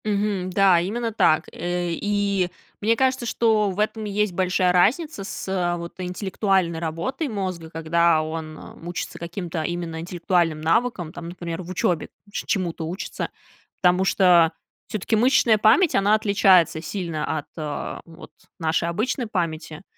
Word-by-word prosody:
Мгм. 200 -3 0
Да, 185 -1 +5
именно 230 +6 -2
так. 155 -7 +3
Э, 175 +1 -2
и 200 0 0 0.3
мне 225 +2 +3
кажется, 260 0 +1
что 220 -3 +2
в 190 +1 -5
этом 215 +1 0
есть 210 -1 0
большая 180 0 +2
разница 225 - +2
с, 195 - -6
э, 175 -2 0
вот 170 0 -7
интеллектуальной 185 -1 0
работой 170 - -3
мозга, 185 -7 -4
когда 165 0 +2
он, 155 0 -5
эм, 165 - -11
учится 175 -1 -5
каким-то 170 -1 -4
именно 170 0 -3
интеллектуальным 170 -1 0
навыкам, 175 -1 0
там, 170 -1 -7
например, 170 -1 -5
в 175 - -10
учёбе 175 -2 0 0.2
че - - -5
чему-то 170 -4 -1
учится. 180 +4 -4 0.5
Потому 180 +1 +4
что 180 -4 +5 0.3
всё-таки 215 +2 -1
мышечная 235 -1 +4
память, 255 - +5
она 205 +2 +4
отличается 195 -6 +4
сильно 160 -2 -3
от, 145 - -10
а, 150 -2 -4
вот 165 +1 -13 0.3
нашей 165 +1 0
обычной 230 +7 -1
памяти, 165 -4 -3
180 Hz, 145 wpm, -23 LUFS, 165-205 Hz, 0.5 s, Да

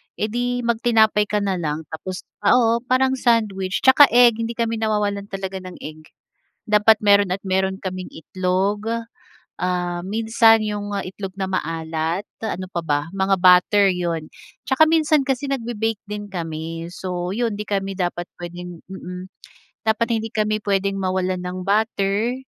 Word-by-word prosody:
eh 215 0 -2
di 245 +1 -1
magtinapay 220 -3 +3
ka 210 -1 0
na 190 -3 -1
lang 155 0 -3
tapos 185 +4 -6 0.2
oo, 230 +2 +3
parang 260 0 +2
sandwich 205 -5 +1
'tsaka 265 +2 +8
egg 240 -2 +6
hindi 230 0 -3
kami 230 -1 -1
nawawalan 205 -2 -1
talaga 190 -1 -5
ng 185 -1 -10
egg. 155 +1 -9 0.6
Dapat 210 +1 +4
meron 200 -2 +4
at 195 - -14
meron 190 0 0
kaming 185 -1 -4
itlog, 190 +5 -1 0.7
ah, 175 0 -2
minsan 225 +1 +4
yung 205 -1 -3
itlog 190 0 -7
na 190 -1 -4
maalat 165 +1 -2 0.2
ano 185 -2 -4
pa 170 -2 -3
ba 145 -1 +1
mga 190 -1 0
butter 185 +2 +6
'yon, 170 -3 -2 0.4
'tsaka 290 +4 +5
minsan 310 -3 +3
kasi 270 +1 -1
nagbe-bake 225 -4 -2
din 205 0 -6
kami 165 -1 -5
so 180 0 -4
'yon 225 -2 -1
'di 210 - -5
kami 195 -1 -2
dapat 175 -1 -2
pwedeng 175 0 -8
mm, 180 -1 -8 0.6
dapat 225 +1 +2
hindi 225 +1 -5
kami 215 -1 +1
pwedeng 195 0 0
mawalan 185 -1 -1
ng 180 +1 -4
butter, 210 +2 +1
195 Hz, 150 wpm, -21 LUFS, 180-225 Hz, 0.7 s, tsaka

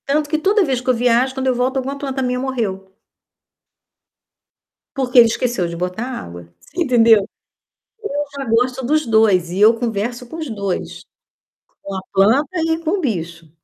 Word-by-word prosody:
Tanto 295 +1 +1
que 310 - +2
toda 410 +1 +4
vez 260 -2 +1
que 255 - -4
eu - - +5
viajo, 245 +2 +2
quando 265 0 -2
eu 255 - +2
volto, 255 +2 0
alguma 270 +2 -3
planta 270 -1 -4
minha 250 0 -1
morreu 215 -8 -3 2.0
porque 255 -2 +3
ele 235 - +8
esqueceu 230 -5 -1
de 170 - -6
botar 180 +5 -3
água, 85 - -8
você 360 - -7
entendeu. 230 -6 +4 0.9
Eu 290 0 -1
já 275 -1 -5
gosto 250 +2 0
dos 305 +3 +1
2 215 -6 +3
e 180 +2 -4
eu 215 +2 +7
converso 235 +1 -3
com 320 - -9
os 315 -4 -5
2. 200 -4 -4 0.8
Com 195 - -6
a 190 - -3
planta 225 +9 +3 0.2
e 320 - +1
com 325 0 -1
o 400 - 0
bicho. 170 - -4
245 Hz, 175 wpm, -19 LUFS, 200-265 Hz, 2.0 s, ele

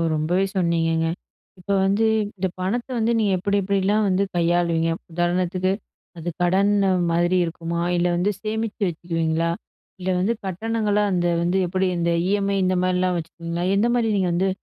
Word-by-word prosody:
ரொம்பவே 175 +5 +1
சொன்னிீங்கங்க. 165 -2 +1 0.5
இப்ப 180 - -18 0.2
வந்து 200 +3 +2 0.3
இந்த 190 - 0
பணத்த 215 +8 -1
வந்து 230 +1 +1
நீங்க 205 -3 +2
எப்பிடி 200 +3 0
எப்பிடிலாம் 200 +2 +1
வந்து 190 +1 +2
கையாளுவீங்க? 170 -1 +2 0.2
உதாரணத்துக்கு 180 +2 0 0.5
அது 170 +1 -4
கடன் 190 +3 +3 0.4
மாதிரி 175 +2 +2
இருக்குமா? 170 0 -4 0.2
இல்ல 175 +1 +2
வந்து 180 +4 +1
சேமிச்சு 220 0 -3
வச்சிருவீங்களா? 165 -1 -1 0.5
இல்ல 185 - -3
வந்து 200 +6 +1
கட்டணங்களா 210 +2 0
அந்த 175 -1 +1
வந்து 175 +2 +1
எப்பிடி 185 +1 0
இந்த 170 0 +1 0.2
இஎம்ஐ 200 0 +1
இந்தமாரிலாம் 185 0 +1
வச்சிருவீங்களா? 170 +1 -5
எந்த 210 +4 +3
மாரி 235 -2 +1
நீங்க 190 -2 +1
வந்து 190 +3 +1
185 Hz, 145 wpm, -23 LUFS, 170-200 Hz, 0.5 s, கடன்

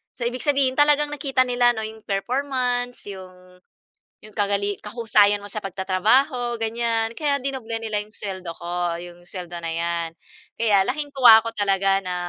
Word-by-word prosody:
So, 250 - -6
ibig 245 -1 -4
sabihin 275 -3 +2
talagang 295 0 +4
nakita 275 -3 +1
nila 245 -1 +3
ano 220 - -3
'yong 220 0 -12
performance, 245 +3 -1
yung 185 -1 -13 0.7
yung 215 - -13
kagali 200 -1 0
kahusayan 210 -2 +3
mo - - -7
sa 215 - -4
pagtatrabaho 220 +7 +1
ganyan 225 0 -1
kaya 290 -1 0
dinoble 260 -4 -4
nila 220 -2 -2
'yong 210 - -11
suweldo 190 -4 -6
ko 175 0 -2
yung 175 0 -11
suweldo 175 -2 -7
na - - -3
'yan. 170 0 -2 0.5
Kaya 210 -4 +4
laking 290 +2 -3
tuwa 240 -4 +9
ko 230 - -2
talaga 195 -1 +2
na 180 -1 -3
220 Hz, 160 wpm, -23 LUFS, 190-250 Hz, 0.7 s, tuwa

